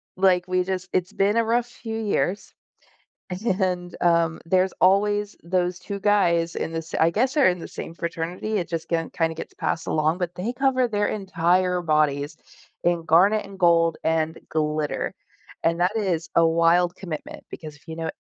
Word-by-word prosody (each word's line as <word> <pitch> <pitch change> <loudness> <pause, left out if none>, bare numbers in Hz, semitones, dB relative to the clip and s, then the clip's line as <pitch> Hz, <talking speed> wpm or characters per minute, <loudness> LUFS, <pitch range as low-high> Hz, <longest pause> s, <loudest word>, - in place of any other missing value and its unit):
like, 185 -1 +3
we 185 0 +1
just 185 0 -3
it's 185 +2 0
been 205 +2 +2
a 230 - +4
rough 235 +1 +1
few 225 -2 -6
years, 200 -1 -1 1.1
and, 180 -2 -1
um, 170 -2 +2
there's 185 +2 +2
always 205 +2 +2
those 180 0 0
2 200 +2 -6
guys 170 -5 +2
in 165 - -3
this 165 0 -5
I 165 +1 +5
guess, 255 - 0
they're 285 -9 +5
in 180 -1 0
the - - -7
same 165 - -7
fraternity, 170 +5 -4
it 175 - -3
just 165 -1 -4
ge 165 -1 -1
kinda 165 -1 0
gets - - -8
passed 165 - -2
along, 155 +3 +1
but 175 -1 -3
they 205 +8 -3
cover 255 -1 +2
their 205 -1 0
entire 180 -2 +1
bodies 150 -1 +1 0.5
in 175 -1 +2
garnet 200 +6 +4
and 195 -1 -12
gold 165 -2 +4
and 160 0 0
glitter. 150 -1 -1 0.5
And 165 +1 +1
that 185 +5 +1
is 180 -6 -1
a 165 0 +6
wild 170 +2 +3
commitment 170 -6 -7
because 155 -3 -8
if 155 - -26
you 160 - -6
know 165 -1 -3
175 Hz, 180 wpm, -24 LUFS, 165-195 Hz, 1.1 s, a